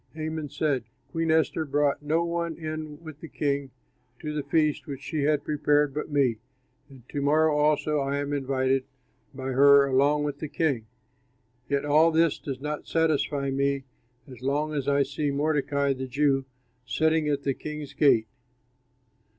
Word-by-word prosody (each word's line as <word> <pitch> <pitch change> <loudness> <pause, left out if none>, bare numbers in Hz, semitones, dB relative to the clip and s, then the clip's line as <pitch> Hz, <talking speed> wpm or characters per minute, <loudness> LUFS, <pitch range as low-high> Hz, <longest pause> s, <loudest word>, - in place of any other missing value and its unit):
Haman 155 -1 -4
said, 135 -5 -1 0.3
"Queen 165 +1 -1
Esther 160 0 +2
brought 145 -1 +1
no 160 +3 +1
one 170 -1 -2
in 155 -1 -6
with 155 -2 -10
the 165 - -9
king 140 -3 -2 0.5
to 150 +2 -5
the 150 - -1
feast 150 +1 0
which 140 -1 -7
she 150 -3 -2
had 150 -1 +2
prepared 145 -1 +1
but 150 +2 -4
me, 135 -6 +2 0.5
and 130 -3 -16
to 145 - -3
morrow 155 +2 +3
also 150 0 +2
I 140 0 -1
am 145 0 -2
invited 135 -1 0 0.5
by 130 0 -4
her 140 +1 +6
along 140 +2 +2
with 145 -1 -3
the 155 - -4
king. 140 -8 -1 0.8
Yet 140 0 0
all 155 +3 +5
this 165 -1 +2
does 135 -3 -5
not 150 +1 -5
satisfy 150 -3 +1
me 140 0 0 0.4
as 125 -3 -12
long 145 +3 -1
as 140 -2 -2
I 140 0 +3
see 145 +2 -2
Mordecai, 140 -1 +1
the 130 0 -5
Jew, 135 +1 +1 0.4
sitting 160 +3 +1
at 140 -1 -1
the 140 - +1
king's 150 0 -7
gate." 125 -7 +4
145 Hz, 165 wpm, -26 LUFS, 140-155 Hz, 0.8 s, her